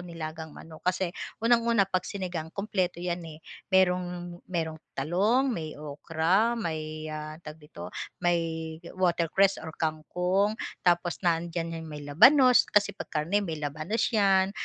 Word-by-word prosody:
nilagang 160 -2 -7
manok. 160 +1 -12
Kasi 185 -1 0 0.3
unang-una, 230 -3 +4
'pag 185 -2 0
sinigang 175 -5 -4
kumpleto 185 -3 -1
'yan, 175 0 -2
eh. 155 0 -10 0.3
Mayroong 180 -2 +1
mayroong 160 -3 -3 0.2
talong, 210 - +2
may 155 -4 -5
okra, 165 +9 +1
may, 155 -4 -4
ah, 155 0 -6
tawag 155 -1 -10
dito? 90 -12 -9 0.3
May 175 -1 +2 0.6
watercress 185 +2 +2
or 160 - -6
kangkong, 180 +6 0 0.3
tapos 175 -1 +2
nandiyan 165 -1 -1
'yong 160 - -8
may 150 -2 -7
labanos. 250 - +6
Kasi 205 -1 +3
'pag - - -8
karne, 190 +7 +1
may 160 -4 -4
labanos 155 +9 -2
'yan, 195 -3 +3
175 Hz, 135 wpm, -28 LUFS, 155-190 Hz, 0.6 s, labanos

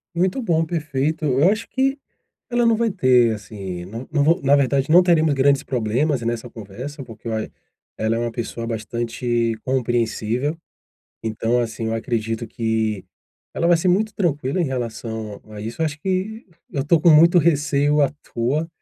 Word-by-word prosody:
Muito 185 +9 +1
bom, 165 -7 +1
perfeito. 155 -1 -2
Eu 140 +6 +4
acho 220 +2 -3
que 270 +1 +1 0.5
ela 240 -1 +2
não 230 -1 +4
vai 230 0 +1
ter, 125 - +4
assim, 95 -4 -7
não 115 +6 -7
não 145 -2 +2
vou 165 -1 +3
na 140 +1 +4
verdade 140 +1 +1
não 175 +3 +8
teremos 160 -4 +3
grandes 140 +1 +3
problemas 125 +4 0
nessa 120 +1 -3
conversa, 120 +8 -8
porque 115 -3 -13 0.7
ela 110 +1 0
é - - -1
uma 120 0 -1
pessoa 115 0 -5
bastante 115 +1 -2
compreensível. 120 +2 -1 0.7
Então, 115 +2 0
assim, 115 -1 -2
eu 110 - -1
acredito 115 0 -2
que 110 -3 -1 0.5
ela 170 - 0
vai 175 0 +5
ser 165 +3 0
muito 210 +4 +1
tranquila 150 -3 0
em - - +2
relação 110 -5 -4
a 105 -1 -8
isso, 115 +8 -6
eu 160 - +3
acho 150 0 -5
que 190 +6 -2 0.3
eu 140 -1 -2
tô 160 +2 +3
com 170 0 +6
muito 170 +3 +7
receio 145 -2 +2
à 140 - +3 0.2
toa, 140 +8 0
135 Hz, 170 wpm, -21 LUFS, 115-165 Hz, 0.7 s, não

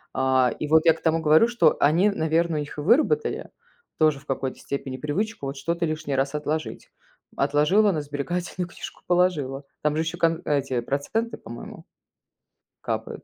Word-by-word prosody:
Э. 130 -1 +3
И 150 - -2
вот 160 +2 +4
я 165 - +8
к 160 - -14
тому 165 0 +1
говорю, 155 +8 +5
что 225 -10 +3
они, 170 +8 +4
наверное, 165 -3 0
у - - 0
них 145 0 -6
и - - -3
выработали 310 - +2 0.5
тоже 155 -3 +3
в 140 - -21
какой-то 135 -1 -3
степени 135 -2 -5
привычку 165 - -3
вот 135 - -4
что-то 170 +5 -1
лишний 155 -3 -3
раз 135 +2 0
отложить. 150 +1 -3 0.5
Отложила, 185 +8 +3
на 155 - -1
сберегательную 175 +5 -4
книжку - - -10
положила. 155 -7 +1 0.2
Там 150 0 +1
же 160 - +1
еще 165 +2 -4
кон 165 0 +1
эти 135 -4 0
проценты, 145 - -2
по-моему 120 - -10 1.0
капают. - - -4
155 Hz, 170 wpm, -24 LUFS, 140-175 Hz, 1.0 s, я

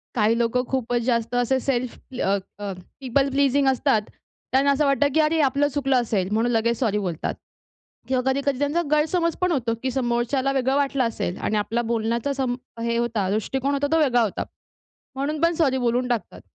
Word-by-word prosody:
काही 225 0 +3
लोकं 240 +1 +1
खूपच 245 -2 -1
जास्त 235 -1 0
असे 245 +2 +2
सेल्फ 250 -2 -2 0.2
अ, 195 +1 +2 0.2
अ, 205 -1 -4 0.3
पीपल 270 +1 +1
प्लीजिंग 275 0 +2
असतात. 265 -3 +2 0.5
त्यांना 275 +2 +4
असं 290 +1 +2
वाटतं 275 0 +3
की 315 - +3
"अरे 315 +1 +3
आपलं 285 +1 +2
चुकलं 270 -2 +1
असेल." 200 -5 -1
म्हणून 230 +3 +1
लगेच 235 0 +1
सॉरी 220 -5 +1
बोलतात. 175 -5 -3 0.7
किंवा 255 -1 +1
कधी-कधी 280 -1 -1
त्यांचा 290 +4 +1
गैरसमजपण 335 +3 +1
होतो 245 -7 0
की 260 - 0
समोरच्याला 250 +2 0
वेगळं 265 0 +1
वाटलं 275 -2 +1
असेल 215 -5 -2
आणि 215 - -1
आपला 225 +3 0
बोलण्याचा 235 +4 0
सम 260 -3 -1 0.3
हे 235 0 0
होता, 230 -5 0
दृष्टिकोन 265 +7 -1
होता 285 0 0
तो 325 - +4
वेगळा 250 -5 +3
होता. 215 -4 -1 0.7
म्हणून 290 +3 -2
पण 335 +1 +3
सॉरी 275 -5 +2
बोलून 245 0 0
टाकतात. 240 -3 -3
255 Hz, 180 wpm, -23 LUFS, 235-280 Hz, 0.7 s, त्यांना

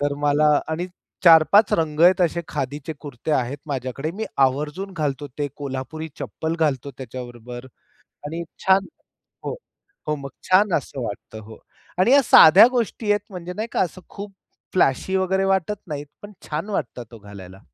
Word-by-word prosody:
तर 145 0 0
मला 145 +1 +3 0.2
आणि 165 +3 -2 0.4
4-5 170 +5 +6
रंग 155 -2 0
आहेत 180 +2 +6
असे 170 0 +1
खादीचे 145 +2 -4
कुर्ते 145 0 -7
आहेत 130 +1 -1
माझ्याकडे, 135 +1 -4
मी 210 +6 -5 0.2
आवर्जून 150 +9 -4
घालतो. 145 -2 -2
ते 145 -1 -1
कोल्हापुरी 145 +3 -5
चप्पल 160 +1 -4
घालतो 140 -3 0
त्याच्याबरोबर 120 -1 -8 0.6
आणि 165 +3 -4 0.2
छान 190 +1 +4 0.6
हो. - - -4 0.5
हो. 150 - 0
मग 140 -1 -8 0.2
छान 185 0 +4
असं 135 -2 -7
वाटतं 110 0 -7
हो, 110 0 -12 0.4
आणि 190 +7 +4
या 280 +1 +7
साध्या 195 +2 +8
गोष्टी 230 -3 -1
आहेत 205 0 -1
म्हणजे 180 -1 -7
नाही 220 +2 -3
का, - - 0
असं 185 +1 -3
खूप 200 0 -9 0.4
फ्लॅशी 185 +2 +1
वगैरे 190 +1 +1
वाटत 195 +1 0
नाहीत, 145 -1 -5 0.2
पण 205 0 -10 0.2
छान 160 +7 -3
वाटतातं 120 - -5
हो - - -13
घालायला. 95 -2 -11
155 Hz, 160 wpm, -22 LUFS, 135-190 Hz, 0.6 s, साध्या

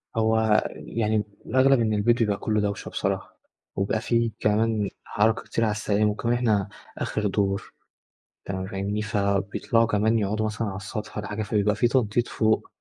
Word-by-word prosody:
هو 110 0 +2
آآ، 110 -1 +3
يعني، 110 -2 -1 0.2
الأغلب 135 0 +4
إن 110 -2 +1
البيت 115 +3 +2
يبقى 105 -3 +2
كله 105 -1 0
دوّشة 100 -1 -3
بصراحة، - - -3 0.4
وبيبقى 100 +2 0
في 115 -1 +1
كمان 105 -1 +1
حركة 110 +2 +1
كتير 115 - -1
على 110 - +2
السلالم، 105 0 +1
وكمان 115 +3 -1
إحنا 110 -5 +1 0.3
آخر 105 -1 -1
دور، 100 0 -1 0.7
تمام 95 -1 -3
فاهمني، 100 +2 -2
فبيطلعوا 100 +2 +1
كمان 110 +1 +2
يقعدوا 105 +1 0
مثلًا 110 +1 -2
على 95 -1 -4
السطح 105 +2 -6
والّا 105 -1 -4
حاجة، 105 +1 -3
فبيبقى 105 0 +1
في 120 +4 +3
تنطيط 120 -2 +1
فوق، 110 -1 +1
105 Hz, 165 wpm, -25 LUFS, 105-115 Hz, 0.7 s, الأغلب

